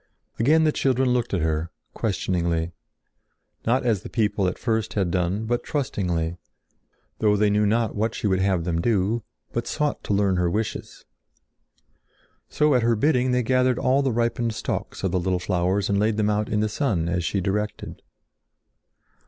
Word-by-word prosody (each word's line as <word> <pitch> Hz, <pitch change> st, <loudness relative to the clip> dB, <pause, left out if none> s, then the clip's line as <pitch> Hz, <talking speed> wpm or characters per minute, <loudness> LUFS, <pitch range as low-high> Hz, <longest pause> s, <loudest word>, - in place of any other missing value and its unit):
Again 155 Hz, +7 st, +4 dB
the 155 Hz, -, +3 dB
children 130 Hz, -2 st, +1 dB
looked 120 Hz, -1 st, 0 dB
at 95 Hz, -, 0 dB
her, 80 Hz, +1 st, -1 dB, 0.2 s
questioningly; 85 Hz, -5 st, -1 dB, 1.0 s
not 125 Hz, +2 st, +2 dB
as 110 Hz, -6 st, +1 dB
the -, -, -9 dB
people 105 Hz, -4 st, +1 dB
at 90 Hz, -, -2 dB
first 110 Hz, -2 st, -1 dB
had 95 Hz, -4 st, 0 dB
done, 90 Hz, +5 st, 0 dB
but 120 Hz, +1 st, -1 dB
trustingly, 90 Hz, -, -2 dB, 0.8 s
though 105 Hz, -1 st, +3 dB
they 105 Hz, 0 st, +3 dB
knew 105 Hz, 0 st, +2 dB
not 115 Hz, +1 st, +1 dB
what 110 Hz, +2 st, -1 dB
she -, -, -4 dB
would 95 Hz, -2 st, +2 dB
have 95 Hz, -3 st, +1 dB
them 85 Hz, -1 st, -1 dB
do, 110 Hz, +2 st, +1 dB, 0.3 s
but 120 Hz, -, -2 dB
sought 150 Hz, -1 st, -1 dB
to -, -, 0 dB
learn 100 Hz, -2 st, +2 dB
her 90 Hz, -1 st, +2 dB
wishes. 105 Hz, +4 st, -4 dB, 1.4 s
So 150 Hz, -1 st, +2 dB
at 125 Hz, -, +3 dB
her 115 Hz, 0 st, +2 dB
bidding 130 Hz, +1 st, +2 dB
they 125 Hz, 0 st, +2 dB
gathered 130 Hz, +1 st, +2 dB
all 135 Hz, +1 st, +2 dB
the 135 Hz, -2 st, +1 dB
ripened 115 Hz, -1 st, 0 dB
stalks -, -, -4 dB
of 95 Hz, -, 0 dB
the 95 Hz, -, +1 dB
little 90 Hz, +1 st, 0 dB
flowers 95 Hz, +2 st, 0 dB
and 100 Hz, -1 st, +1 dB
laid 105 Hz, +1 st, +1 dB
them 105 Hz, -1 st, +2 dB
out 105 Hz, 0 st, -1 dB
in 105 Hz, 0 st, +1 dB
the 110 Hz, -, +1 dB
sun 105 Hz, -, -1 dB
as 90 Hz, 0 st, -1 dB
she 100 Hz, -, -1 dB
directed. 105 Hz, +3 st, -3 dB
105 Hz, 175 wpm, -24 LUFS, 95-120 Hz, 1.4 s, Again